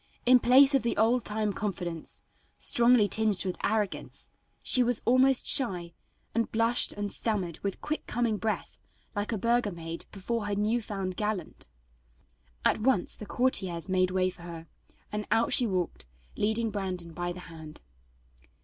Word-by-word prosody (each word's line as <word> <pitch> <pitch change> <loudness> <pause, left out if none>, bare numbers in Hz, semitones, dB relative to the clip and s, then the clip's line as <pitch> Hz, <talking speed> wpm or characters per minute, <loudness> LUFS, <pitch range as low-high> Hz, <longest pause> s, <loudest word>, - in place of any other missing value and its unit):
In 250 +1 +7
place 270 +4 +6
of 270 - +3
the 235 - -2
old 230 +3 +3
time 210 -1 -1
confidence, 180 -6 -4 0.3
strongly 235 -3 +4
tinged 210 -4 0
with 185 - -2
arrogance, 210 -2 -2 0.3
she 255 - +5
was 245 -1 +1
almost 255 +1 +4
shy, 180 - +3 0.4
and 230 0 -1
blushed 230 +2 +3
and 205 -1 -3
stammered 190 -7 0
with 200 -1 -4
quick 310 - -4
coming 235 -3 0
breath, 215 +1 -3 0.4
like 205 +2 -2
a 220 - -1
burgher 235 0 +1
maid 165 -1 -7
before 210 +2 -3
her 205 - -1
new 215 +4 0
found 195 -4 -5
gallant. 210 -5 -3 1.0
At - - +3
once 240 -6 +2
the 210 - -9
courtiers 190 -10 -1
made 185 -1 +2
way 185 0 +1
for 175 - -15
her, 170 -1 -8 0.5
and 210 0 -4
out 225 +2 +2
she 245 - +4
walked, 175 - -3 0.3
leading 220 +2 0
Brandon 185 -5 -4
by 175 +1 -3
the 180 +1 -7
hand. 160 -3 -11
210 Hz, 160 wpm, -28 LUFS, 185-235 Hz, 1.0 s, In